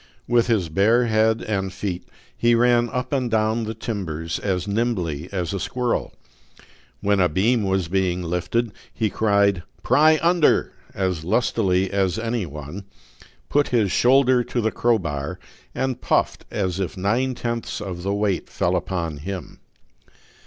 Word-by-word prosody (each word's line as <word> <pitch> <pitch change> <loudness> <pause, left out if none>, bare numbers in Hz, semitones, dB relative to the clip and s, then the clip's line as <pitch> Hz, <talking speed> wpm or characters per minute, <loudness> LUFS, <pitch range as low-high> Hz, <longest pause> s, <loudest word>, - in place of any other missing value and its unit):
With 120 0 +3
his 110 -7 +1
bare 105 +9 +3
head 110 0 +2
and 95 -3 -2
feet 95 -2 -4 0.3
he 120 0 +3
ran 120 0 +3
up 125 +3 -3
and 130 -3 0
down 110 0 +1
the 110 +1 -4
timbers 85 -8 -4
as 95 -1 -2
nimbly 95 -8 -1
as 90 -2 -2
a 100 - -2
squirrel. 125 +5 -1 0.9
When 100 0 +2
a 90 -1 +4
beam 110 +9 +2
was 95 -3 0
being 90 0 0
lifted, 90 +7 -1 0.2
he 110 -3 -1
cried, 100 -3 +2 0.2
"Pry 155 +5 +5
under!" 170 -2 +3 0.2
as 95 -4 -1
lustily 95 -2 +1
as 95 -1 +1
any 115 -3 -2
one, 75 +6 -8 0.6
put 145 0 +2
his 110 -6 +1
shoulder 130 0 +4
to 120 - -3
the 110 -1 +1
crowbar, 85 -12 -1 0.4
and 130 -2 -2
puffed - - 0
as 95 -2 -2
if 95 -1 -3
nine 120 +7 0
tenths 115 -1 -3
of 95 -4 -5
the 100 +2 -2
weight 100 -2 -1
fell - - 0
upon 85 -5 -2
him. 90 +2 -7
100 Hz, 150 wpm, -23 LUFS, 90-120 Hz, 0.9 s, Pry